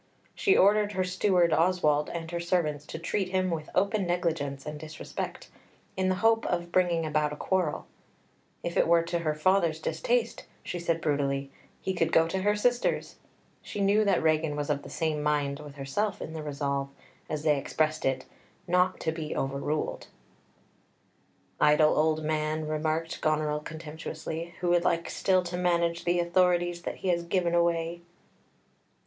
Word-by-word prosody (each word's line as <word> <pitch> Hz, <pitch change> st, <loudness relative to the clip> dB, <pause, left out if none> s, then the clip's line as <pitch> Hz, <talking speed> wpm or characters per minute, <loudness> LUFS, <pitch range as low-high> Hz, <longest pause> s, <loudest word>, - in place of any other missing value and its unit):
She 395 Hz, -, +3 dB
ordered 205 Hz, +1 st, +4 dB
her 185 Hz, -1 st, +1 dB
steward 180 Hz, -2 st, +2 dB
Oswald 155 Hz, -4 st, +2 dB
and 165 Hz, -1 st, -5 dB
her 170 Hz, -, -2 dB
servants 160 Hz, -4 st, -1 dB
to -, -, -6 dB
treat 185 Hz, +3 st, -2 dB
him 185 Hz, -1 st, 0 dB
with 160 Hz, -2 st, -4 dB
open 200 Hz, 0 st, +1 dB
negligence 160 Hz, -6 st, -1 dB
and 150 Hz, 0 st, -6 dB
disrespect, 155 Hz, +1 st, -6 dB, 0.4 s
in 185 Hz, 0 st, +1 dB
the 185 Hz, -, +2 dB
hope 225 Hz, 0 st, +4 dB
of 175 Hz, -1 st, -2 dB
bringing 175 Hz, -2 st, +2 dB
about 150 Hz, -1 st, +1 dB
a -, -, -4 dB
quarrel; 180 Hz, -1 st, -1 dB, 0.8 s
if 170 Hz, -, -3 dB
it -, -, +4 dB
were 170 Hz, 0 st, +5 dB
to 170 Hz, +1 st, -2 dB
her 155 Hz, -2 st, -1 dB
father's 170 Hz, -1 st, +2 dB
distaste, 230 Hz, +10 st, -1 dB, 0.2 s
she 175 Hz, -, -4 dB
said 165 Hz, -1 st, -1 dB
brutally, 140 Hz, -2 st, -1 dB, 0.3 s
he 190 Hz, -, -1 dB
could 165 Hz, -2 st, 0 dB
go 165 Hz, 0 st, +4 dB
to 190 Hz, -, -1 dB
her 205 Hz, +2 st, +2 dB
sister's; 245 Hz, +3 st, 0 dB, 0.4 s
she -, -, -7 dB
knew 200 Hz, +2 st, +4 dB
that 195 Hz, -5 st, +2 dB
Regan 155 Hz, -1 st, +2 dB
was 145 Hz, 0 st, -1 dB
of 145 Hz, -1 st, -1 dB
the -, -, -10 dB
same 155 Hz, -2 st, -1 dB
mind 145 Hz, -1 st, 0 dB
with 145 Hz, -2 st, -10 dB
herself 145 Hz, +10 st, -2 dB
in 160 Hz, -, -6 dB
the 160 Hz, -, -5 dB
resolve, 140 Hz, -2 st, -2 dB, 0.4 s
as 155 Hz, -1 st, -3 dB
they 150 Hz, -3 st, +3 dB
expressed 155 Hz, +2 st, -1 dB
it, 130 Hz, -1 st, 0 dB, 0.4 s
"not 180 Hz, +1 st, +2 dB
to 160 Hz, -, 0 dB
be 155 Hz, -1 st, -5 dB
overruled." 140 Hz, +3 st, -2 dB, 1.5 s
"Idle 150 Hz, +1 st, +5 dB
old 155 Hz, 0 st, +2 dB
man," 155 Hz, 0 st, -1 dB
remarked 155 Hz, +1 st, -2 dB
Goneril 155 Hz, -1 st, +1 dB
contemptuously, 160 Hz, +2 st, -6 dB
"who 175 Hz, -, +1 dB
would 175 Hz, 0 st, +3 dB
like 170 Hz, -1 st, 0 dB
still 185 Hz, -1 st, +2 dB
to 175 Hz, 0 st, -4 dB
manage 170 Hz, -1 st, +1 dB
the 175 Hz, 0 st, +2 dB
authorities 175 Hz, 0 st, +2 dB
that -, -, -4 dB
he -, -, +2 dB
has 170 Hz, -1 st, +2 dB
given 170 Hz, 0 st, 0 dB
away." 170 Hz, 0 st, +1 dB
165 Hz, 165 wpm, -28 LUFS, 155-180 Hz, 1.5 s, were